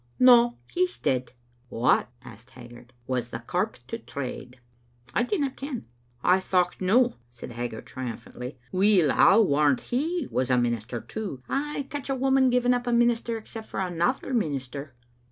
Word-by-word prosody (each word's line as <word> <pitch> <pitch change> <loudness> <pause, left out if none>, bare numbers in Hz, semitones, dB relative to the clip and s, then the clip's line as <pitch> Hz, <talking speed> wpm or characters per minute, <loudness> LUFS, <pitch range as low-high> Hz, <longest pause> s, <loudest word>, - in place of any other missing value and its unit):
"No; 240 -1 +6
he's 365 +1 0
dead." 125 -1 -1 0.4
"What," 120 +1 +2
asked 120 0 -13
Haggart, 120 0 -13
"was 125 -2 -2
the 115 - -4
corp 180 - -2
to 230 - -5
trade?*' 130 - -7 0.6
"Idinnaken." 270 - -1 0.2
" 120 0 -36
I 190 - +4
thocht 180 -1 0
no," 235 +7 +3
said 120 0 -10
Haggart, 120 -1 -5
triumphantly. 125 +1 -7
"Weel, 185 -5 +4
I 195 - +6
warrant 145 - +4
he 315 +5 -2
was 130 0 0
a 125 - +4
minister 120 -1 -1
too. 195 -13 -6
Ay, 285 0 -2
catch 285 -2 -5
a 270 - +1
woman 265 0 +3
giving 250 0 +3
up 245 0 -2
a - - +1
minister, 235 -1 +2
except 220 0 -9
for - - -5
another 185 +9 -1
minister." 140 - -3
185 Hz, 155 wpm, -26 LUFS, -, 0.6 s, No